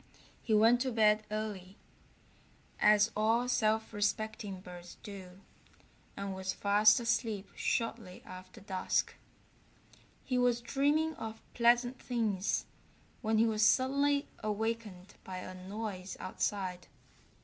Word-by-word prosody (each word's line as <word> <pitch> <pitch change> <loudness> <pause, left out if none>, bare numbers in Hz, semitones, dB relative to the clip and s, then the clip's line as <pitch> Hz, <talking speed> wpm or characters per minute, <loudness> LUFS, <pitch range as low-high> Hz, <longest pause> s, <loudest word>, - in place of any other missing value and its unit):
He 220 - +1
went 230 +3 +5
to 260 0 0
bed 215 -1 +3
early, 210 -2 -5 1.0
as 210 +1 +5
all 225 +3 +2
self 220 -2 +1
respecting 205 -1 -2
birds 180 -1 -11
do, 190 -2 -10 0.8
and 200 -1 -3
was 190 0 -3
fast 210 +3 +5
asleep 230 -4 -1
shortly 225 -6 -2
after 185 0 -11
dusk. 190 -1 -1 1.1
He 255 -2 0
was 245 -1 +3
dreaming 290 +6 +1
of 220 0 -6
pleasant 245 +1 +3
things 215 -6 -1 0.6
when 220 -2 +1
he 225 - +5
was 215 -2 0
suddenly 280 +4 +3
awakened 215 -3 -3
by 185 -1 -6
a 185 0 -7
noise 190 0 -6
outside. 185 -2 -3
215 Hz, 115 wpm, -32 LUFS, 195-235 Hz, 1.1 s, went